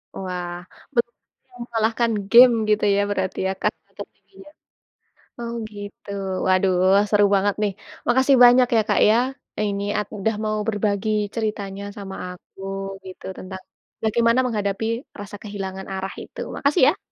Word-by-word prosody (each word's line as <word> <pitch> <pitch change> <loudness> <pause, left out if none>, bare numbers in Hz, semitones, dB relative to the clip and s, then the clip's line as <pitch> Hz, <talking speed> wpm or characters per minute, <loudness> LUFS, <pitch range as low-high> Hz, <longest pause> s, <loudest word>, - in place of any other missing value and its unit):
Wah. 180 -2 -5 0.3
Belum 235 0 +1
ada - - -61
yang 245 - -16
mengalahkan 230 0 +1 0.2
game, 245 +1 +9 0.2
gitu 210 0 +3
ya, 200 - +3
berarti 190 -2 -2
ya 190 - 0
tahta - - -2
tertingginya? 385 - -12 0.9
Oh 235 0 -4 0.2
gitu. 205 0 -10 0.4
Waduh, 185 0 +3 0.4
seru 205 0 +5
banget 200 +1 +1
nih. 210 -1 +1 0.4
Makasih 260 +3 +4
banyak 245 +1 +7
ya - - +5
Kak - - +3
ya, 215 - +5 0.5
ini 200 0 -3
at 210 -1 -1
udah 220 +3 0
mau 215 0 0
berbagi 205 -1 0 0.3
ceritanya 205 -3 -3
sama 195 -1 -7 0.2
aku 180 +1 -17 0.4
gitu, 185 -1 -11
tentang 190 0 -8 0.4
bagaimana 230 +2 +3
menghadapi 210 -3 -1 0.3
rasa 205 0 -8
kehilangan 190 -2 -6
arah 190 0 -4
itu. - - -9
Makasih 285 +4 +1
ya! - - -16
205 Hz, 145 wpm, -22 LUFS, 195-230 Hz, 0.9 s, game